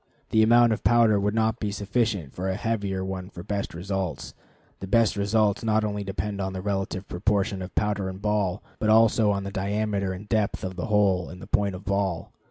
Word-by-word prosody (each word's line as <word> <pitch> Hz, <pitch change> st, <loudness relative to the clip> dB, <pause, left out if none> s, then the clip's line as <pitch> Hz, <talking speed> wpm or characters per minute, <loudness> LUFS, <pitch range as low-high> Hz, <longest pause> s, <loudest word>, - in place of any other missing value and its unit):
The 110 Hz, -, +4 dB
amount 120 Hz, +1 st, +5 dB
of -, -, -5 dB
powder 110 Hz, 0 st, +4 dB
would 105 Hz, +2 st, 0 dB
not 110 Hz, 0 st, +1 dB
be 105 Hz, -, -2 dB
sufficient 100 Hz, -, -1 dB
for 95 Hz, +2 st, -3 dB
a 95 Hz, -, -1 dB
heavier 100 Hz, -3 st, -2 dB
one 95 Hz, -1 st, -5 dB
for 85 Hz, -3 st, -9 dB
best 100 Hz, -2 st, -3 dB
results. 95 Hz, 0 st, -4 dB, 0.5 s
The 95 Hz, -, -6 dB
best 115 Hz, +2 st, +3 dB
results 100 Hz, +1 st, +1 dB
not 110 Hz, -1 st, +2 dB
only 105 Hz, -1 st, -2 dB
depend 100 Hz, +1 st, -3 dB
on 95 Hz, 0 st, -3 dB
the 95 Hz, -, -4 dB
relative 95 Hz, -2 st, -2 dB
proportion 100 Hz, +1 st, 0 dB
of 90 Hz, -, -8 dB
powder 105 Hz, -2 st, 0 dB
and 95 Hz, 0 st, -7 dB
ball, 105 Hz, -2 st, 0 dB, 0.2 s
but 110 Hz, -, +1 dB
also 110 Hz, 0 st, +5 dB
on 100 Hz, -1 st, 0 dB
the 100 Hz, -, -5 dB
diameter 100 Hz, 0 st, -1 dB
and 95 Hz, +3 st, -7 dB
depth 105 Hz, -2 st, 0 dB
of 95 Hz, 0 st, -4 dB
the 90 Hz, -, -4 dB
hole 100 Hz, -4 st, +2 dB
in 90 Hz, -, -9 dB
the -, -, -10 dB
point 100 Hz, -2 st, 0 dB
of 90 Hz, -, -10 dB
ball. 95 Hz, -3 st, -1 dB
100 Hz, 210 wpm, -26 LUFS, 95-105 Hz, 0.5 s, amount